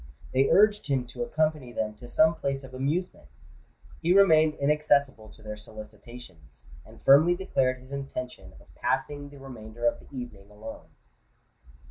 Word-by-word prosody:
They 135 +1 +3
urged 210 -3 +4
him 135 -3 0
to - - -7
accompany 155 - -1
them 110 -2 -2
to 120 - -11
some 160 +6 +4
place 140 -3 -3
of 130 -1 -12
amusement: 140 - -2 0.7
he 175 +4 +4
remained 160 -5 +5
inaccessible 140 -5 +1
to - - -16
their 105 0 -6
solicitations, 105 - -12 0.2
and - - -16
firmly 155 +6 +6
declared 135 -9 0
his 130 +1 -15
intention 135 -2 -6
of - - -21
passing 145 -1 -2
the 140 - -14
remainder 120 -4 -8
of 120 - +2
the - - -17
evening 120 -7 -8
alone. 110 +2 -10
135 Hz, 150 wpm, -27 LUFS, 110-150 Hz, 0.7 s, firmly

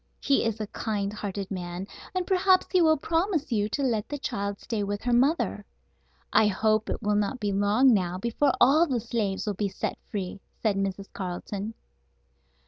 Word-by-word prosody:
He 280 - +2
is 225 -1 -1
a 215 - -2
kind 205 -1 -3
hearted 200 -2 -5
man, 180 0 -4 0.3
and 365 -1 0
perhaps 375 0 +4
he 370 - +4
will 315 -1 +5
promise 330 -1 0
you 210 -2 +1
to 280 +6 -1
let 225 -5 0
the 290 - -3
child 200 -7 -3
stay 220 -3 -3
with 205 0 -3
her 245 -1 +1
mother. 275 +7 +2 0.7
I 215 - +6
hope 215 +2 +1
it - - -3
will 210 0 +1
not 210 +5 0
be 205 -2 -1
long 205 +6 +4
now 180 -3 0
before 235 +7 +1
all 300 +7 +6
the 255 -5 0
slaves 215 -4 -2
will 210 - -1
be 200 +1 -1
set 190 - -4
free," 195 -1 -4 0.2
said 215 -3 +1
Mrs. 195 0 -3
Carleton. 195 +3 -5
215 Hz, 185 wpm, -27 LUFS, 200-265 Hz, 0.7 s, I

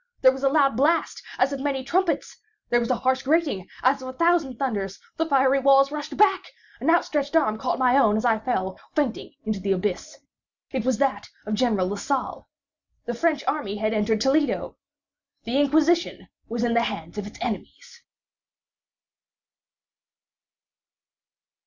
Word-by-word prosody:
There 260 - +7
was 265 0 -7
a 275 - +3
loud 275 -4 +3
blast 310 +7 +1 0.2
as 270 +2 +2
of 275 - -4
many 270 -1 -2
trumpets! 345 +5 -1 0.4
There 240 - +4
was 235 - -2
a 255 - +2
harsh 260 +2 0
grating 280 - 0 0.2
as 270 +2 +3
of 260 - -7
a 255 - -6
thousand 330 -4 +1
thunders! 205 -8 -3 0.2
The 325 0 -1
fiery 270 -2 +3
walls 275 +1 +4
rushed 300 0 -6
back! 385 -2 +3 0.3
An 285 - -1
outstretched 300 -3 +1
arm 220 -9 +2
caught - - -1
my 255 -1 +3
own 220 -6 +4
as 220 - -2
I 225 -2 +3
fell, 190 -5 -2 0.2
fainting, 280 -6 -2
into 215 -2 -2
the 195 +1 0
abyss. 185 0 -3 0.5
It 255 -4 -2
was 255 -3 +1
that 260 -6 -1 0.2
of 215 - -3
General 210 -4 +1
Lasalle. 230 +7 -3 0.6
The 240 - -3
French 300 +3 0
army 245 -10 -2
had 215 +1 -1
entered 215 0 0
Toledo. 285 +4 +1 0.7
The 255 +5 +1
Inquisition 315 +4 +1 0.2
was 235 +1 -2
in 235 -1 +1
the 235 - +3
hands 170 -3 -5
of 205 - -5
its 210 - -12
enemies. 480 - -6
260 Hz, 160 wpm, -24 LUFS, 220-290 Hz, 0.7 s, There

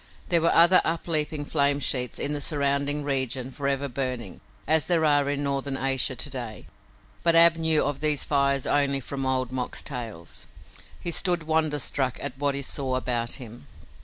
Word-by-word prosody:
There 170 -2 +3
were 165 - +3
other 170 +2 +7
upleaping 155 -2 0
flame 140 -1 +1
sheets 125 -3 0
in 145 - -2
the 145 - -4
surrounding 140 0 -1
region 130 -2 -2
forever 140 0 -2
burning 125 -7 -4 0.2
as 160 -1 +3
there 165 -3 +2
are 145 -2 +3
in 145 0 -2
northern 140 -1 -2
Asia 135 0 0
to - - -2
day 120 -5 -6 0.6
but 170 -1 +3
Ab 170 0 +7
knew 160 -1 +2
of 140 0 -2
these 150 -2 0
fires 140 -2 +1
only 140 -1 +1
from 135 +1 -4
Old 130 -1 -1
Mok's 130 -1 -3
tales. 115 - -4 0.5
He 170 - -4
stood 175 -1 0
wonderstruck 150 -5 0
at 140 - -4
what 140 -1 0
he 140 - -3
saw 130 -1 -2
about 120 -2 -1
him. 120 - -9
140 Hz, 170 wpm, -25 LUFS, 130-150 Hz, 0.6 s, other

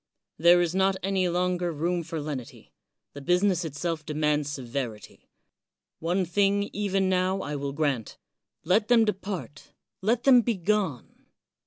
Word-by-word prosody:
There 175 +2 +6
is 175 -1 0
not 190 +1 +2
any 190 -2 +1
longer 180 0 0
room 170 +3 -1
for 165 0 -5
lenity; 145 -5 -7 0.4
the 145 - -9
business 180 +3 +2
itself 160 +1 -3
demands 150 -1 0
severity. 125 -5 -6 0.7
One 180 +3 0
thing, 200 +3 +1
even 195 -2 0
now, 185 +1 +1
I 145 - -4
will 140 0 -3
grant 140 -6 -2 0.2
— - - -59
let 210 +1 +3
them 235 -2 +5
.depart, 195 -7 -5 0.3
let 225 +4 +1
them 255 -3 +7
begone. 200 - -2
175 Hz, 140 wpm, -27 LUFS, 150-195 Hz, 0.7 s, them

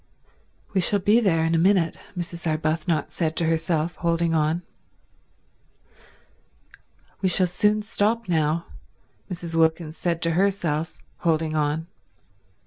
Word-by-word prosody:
"We 190 - +2
shall 205 +3 +3
be 205 +4 +4
there 165 -8 +2
in 165 - +1
a 165 - +3
minute," 180 -1 +3 0.2
Mrs. 170 -1 -4
Arbuthnot 155 0 -1
said 160 -2 -1
to 170 - +1
herself, 165 0 0
holding 170 -1 0
on. 160 +2 +1 2.6
"We 190 - +2
shall 185 +1 +4
soon 210 +4 +1
stop 220 +2 0
now," 160 -1 +1 0.6
Mrs. 170 -2 -4
Wilkins 160 0 +1
said 170 -2 -1
to 165 - +2
herself, 165 -4 0 0.2
holding 160 -1 0
on. 150 +1 0
165 Hz, 125 wpm, -24 LUFS, 160-180 Hz, 2.6 s, be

